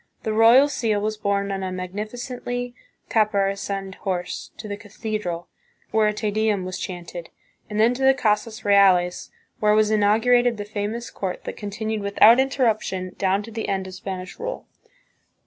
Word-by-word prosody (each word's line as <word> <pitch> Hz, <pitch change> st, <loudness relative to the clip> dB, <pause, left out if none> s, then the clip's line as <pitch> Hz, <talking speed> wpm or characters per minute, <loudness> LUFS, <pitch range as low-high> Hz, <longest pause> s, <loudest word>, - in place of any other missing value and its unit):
The 220 Hz, -, -1 dB
royal 230 Hz, +6 st, +7 dB
seal 225 Hz, -7 st, 0 dB
was 215 Hz, +1 st, -1 dB
borne 200 Hz, -1 st, -1 dB
on 195 Hz, 0 st, -3 dB
a 185 Hz, -1 st, -3 dB
magnificently 240 Hz, +6 st, -5 dB, 0.3 s
caparisoned 195 Hz, -2 st, 0 dB
horse 180 Hz, -2 st, -3 dB
to 215 Hz, -, -8 dB
the 205 Hz, -, -4 dB
cathedral, 205 Hz, -4 st, -5 dB, 0.4 s
where 220 Hz, -1 st, +3 dB
a -, -, +2 dB
Te 210 Hz, 0 st, -2 dB
Deum 210 Hz, -3 st, 0 dB
was 185 Hz, 0 st, -5 dB
chanted, 175 Hz, -2 st, -7 dB, 0.4 s
and 210 Hz, 0 st, -3 dB
then 230 Hz, +3 st, +5 dB
to 255 Hz, -, -6 dB
the 265 Hz, 0 st, +5 dB
Casas 220 Hz, -2 st, -1 dB
Reales, 190 Hz, -3 st, +4 dB, 0.3 s
where 210 Hz, 0 st, +4 dB
was 215 Hz, 0 st, +3 dB
inaugurated 225 Hz, +3 st, +3 dB
the 205 Hz, -, -5 dB
famous 215 Hz, +3 st, -4 dB
court 190 Hz, -2 st, -4 dB
that -, -, -5 dB
continued 215 Hz, +1 st, -4 dB
without 210 Hz, +4 st, +6 dB
interruption 220 Hz, -9 st, 0 dB
down 195 Hz, +1 st, +1 dB
to 230 Hz, -, -10 dB
the 225 Hz, 0 st, -4 dB
end 190 Hz, -1 st, -1 dB
of 190 Hz, -, -8 dB
Spanish 185 Hz, -1 st, -7 dB
rule. -, -, -5 dB
210 Hz, 165 wpm, -23 LUFS, 195-225 Hz, 0.4 s, royal